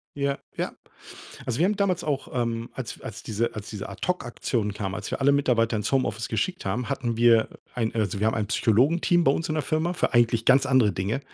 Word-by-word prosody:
Ja, 140 -1 0 0.2
ja. - - -2 0.7
Also, 120 -2 -2
wir 175 - +4
haben 210 +2 +1
damals 185 -4 0
auch, 140 -3 -2
ähm, 115 -2 -2
als 130 -4 -7
als 110 +1 -8
diese 115 +2 -1
als 105 -1 -7
diese 105 -3 -6
Ad-Hoc-Aktion 120 - -2
kam. 95 -2 -4
Als - - -6
wir - - -2
alle 140 +1 +4
Mitarbeiter 120 -5 +2
ins 105 - -2
Homeoffice 115 -4 0
geschickt 180 - -2
haben, 115 +6 -2
hatten 120 -4 -2
wir, 115 -1 +5
äh, - - -14 0.2
ein 115 -2 -1
also, 105 -3 -1
wir 110 - +3
haben 110 - +1
ein 105 -2 -1
Psychologenteam 150 - +3
bei 135 - +6
uns 165 +2 -3
in 155 - 0
der 155 - +1
Firma 155 +5 0
für 180 - -1
eigentlich 115 -1 +3
ganz 135 +1 +5
andere 130 -7 +4
Dinge. 95 +8 -1
120 Hz, 220 wpm, -25 LUFS, 110-140 Hz, 0.7 s, bei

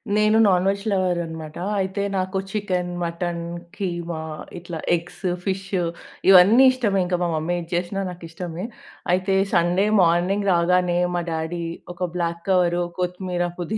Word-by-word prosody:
నేను 215 +1 +4
non 185 -1 +3
veg 200 0 +1
lover 185 -2 +1
అనమాటా. 160 0 -7 0.2
అయితే 190 +1 -2
నాకు 185 +1 -1
చికెన్, 185 -4 -1
మటన్, 170 0 -3 0.3
కీమా 170 -4 -3 0.3
ఇట్లా 170 -2 -6 0.2
ఎగ్స్, 175 +1 -8 0.2
ఫిష్ 190 -1 -2 0.6
ఇవన్నీ 195 +7 +8
ఇష్టమే. 210 -7 0
ఇంక 180 0 0
మా 175 - +2
మమ్మీ 160 +3 -1
ఏది 165 0 -8
చేసినా 180 +3 -1
నాకిష్టమే. 170 0 -7 0.5
అయితే 185 +2 +1 0.2
సండే 175 +3 +3 0.2
మార్నింగ్ 180 +4 +2
రాగానే 175 0 +2 0.2
మా 175 - 0
డాడీ, 160 +1 -3 0.3
ఒక 180 0 -2
బ్లాక్ 170 -1 -2
కవర్, 180 -2 +3 0.2
కొత్తిమీర, 180 0 -2 0.2
పుదీనా 195 +6 -2
180 Hz, 140 wpm, -23 LUFS, 170-190 Hz, 0.6 s, ఇవన్నీ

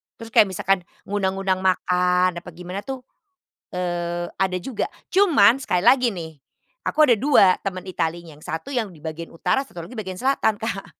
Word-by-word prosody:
Terus 230 0 -11
kayak 210 - +6
misalkan 190 +1 +1 0.3
ngundang-ngundang 195 -1 -1
makan 180 0 +2
apa 175 - -11
gimana 180 +2 -6
tuh, 265 0 -6 0.7
eee, 175 -1 -2
ada 190 -1 +1
juga. 255 +3 -3 0.3
Cuman 320 - +5
sekali 180 -9 0
lagi 250 +1 +5
nih 160 -4 -8 0.5
aku 310 - +4
ada 235 - +5
2 225 -9 +5
teman 185 -2 -4
Italy 170 -2 -3
yang 150 -1 -14
1 160 - -6
yang 225 -8 -2
di 155 - -17
bagian 160 +1 -5
utara, 265 +11 0
1 175 -10 -9
lagi 235 +8 -10
bagian 190 -4 -5
selatan 260 -5 +2
Kak. 210 -3 -3
190 Hz, 170 wpm, -23 LUFS, 175-225 Hz, 0.7 s, kayak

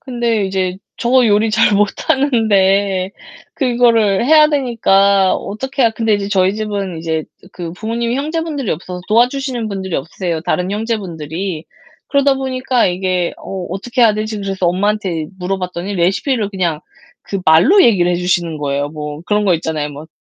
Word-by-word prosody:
근데 235 -5 -1
이제 185 -1 -2 0.2
저 250 0 +3
요리 215 +1 +3
잘 215 -1 +3
못하는데 200 -4 +1 0.4
그거를 235 -6 +2
해야 305 +2 +6
되니까 200 -8 +3
어떻게 265 +6 -3
해야 230 - +4
근데 220 -1 0
이제 200 -1 -2
저희 190 -1 +2
집은 200 -5 -3
이제 160 -1 -2 0.3
그 170 -2 -6
부모님이 230 +5 -2
형제분들이 305 - -3
없어서 180 +3 -5
도와주시는 245 +1 +1
분들이 190 -3 -3
없으세요. 165 +3 -3
다른 180 +2 -1
형제분들이. 185 -6 -4 0.4
그러다 280 -1 +3
보니까 260 -2 0
이게 180 -1 -1
'어, 190 -2 -6
어떻게 235 +7 -3
해야 215 -2 +5
되지?' 215 0 -3
그래서 195 -2 -2
엄마한테 185 -3 0
물어봤더니 180 +1 -3
레시피를 200 - 0
그냥 175 -6 -1 0.4
그 195 - -4
말로 180 - +6
얘기를 180 -6 +3
해주시는 175 -3 -1
거예요. 145 0 -2
뭐 150 0 -7
그런 210 0 +1
거 185 - +3
있잖아요 155 -3 -3
뭐. 145 +2 -10
200 Hz, 365 characters per minute, -16 LUFS, 180-235 Hz, 0.4 s, 해야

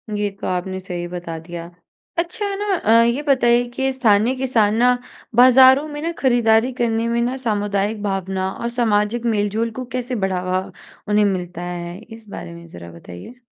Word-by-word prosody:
ये 205 0 0
तो - - -3
आपने 185 +1 -2
सही 180 -2 -5
बता 175 -2 -6
दिया। 170 +1 -8 0.5
अच्छा 375 +4 -2
ना 405 -1 -1
अ, 220 - 0
ये 235 +4 +1
बताइए 245 -4 +3
कि 265 +2 -1
स्थानीय 235 -1 +3
किसान 235 -5 +1
ना 245 +2 +3 0.4
बाज़ारों 260 +3 +7
में 295 -1 -7
ना 335 +2 -2
खरीदारी 240 -2 +3
करने 230 -2 0
में 235 0 0
ना 245 +2 -1
सामुदायिक 205 -3 -1
भावना 190 -1 -2
और 235 - -4
सामाजिक 220 +1 +1
मेल-जोल 220 0 0
को 255 - -4
कैसे 250 0 -3
बढ़ावा 185 0 -2 0.4
उन्हें 210 0 +3
मिलता 180 -3 -3
है? 175 0 -6
इस 225 0 -14
बारे 170 - -8
में 170 0 -12
ज़रा 85 - -11
बताइए। 90 - -12
220 Hz, 170 wpm, -20 LUFS, 185-250 Hz, 0.5 s, बाज़ारों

